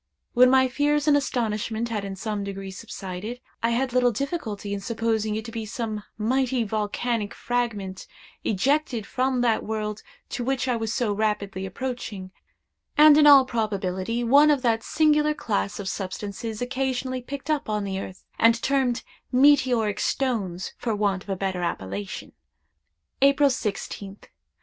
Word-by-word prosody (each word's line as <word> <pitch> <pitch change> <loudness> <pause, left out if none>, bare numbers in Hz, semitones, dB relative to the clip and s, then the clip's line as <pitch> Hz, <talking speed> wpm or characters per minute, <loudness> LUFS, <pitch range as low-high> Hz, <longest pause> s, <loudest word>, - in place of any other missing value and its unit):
When 250 0 +7
my 260 0 +5
fears 290 +3 +1
and 295 - +6
astonishment 230 -4 -1
had 215 -3 -2
in 195 -1 -5
some 210 +1 -3
degree 195 -1 -6
subsided, 195 +2 -7 0.2
I 230 - +2
had 250 +2 0
little 250 -1 +4
difficulty 220 -6 -3
in 200 - -2
supposing 220 0 -1
it 220 0 -4
to 230 - -7
be 225 -1 -4
some 215 0 -4 0.2
mighty 255 +2 +1
volcanic 215 +1 -2
fragment 215 -6 -3 0.4
ejected 250 +1 +1
from 255 +1 0
that 230 -2 +2
world 215 -1 -3 0.3
to 245 - -3
which 265 +1 -1
I 250 - +2
was 225 -1 -2
so 225 -3 0
rapidly 200 -2 -1
approaching, 205 -3 -5 0.7
and, 300 0 +9
in 300 0 +6
all 275 -2 +9
probability, 215 -1 -2
one 285 +6 +6
of 285 -3 +2
that 230 -2 +2
singular 300 +2 +2
class 210 -8 -2
of 200 - -5
substances 205 +4 -4
occasionally 255 0 -2
picked 280 +4 -5
up 295 -6 -1
on 210 -1 0
the 195 -1 -3
earth, 190 -1 -8 0.2
and 230 0 +5
termed 265 -3 +1 0.3
meteoric 255 -6 +4
stones 200 -9 -1
for 230 -3 -1
want 200 -2 0
of - - -15
a 195 - 0
better 190 -1 -2
appellation. 100 - -4 0.9
"April 280 +1 +5
16th. 200 -3 -4
230 Hz, 155 wpm, -25 LUFS, 205-260 Hz, 0.9 s, and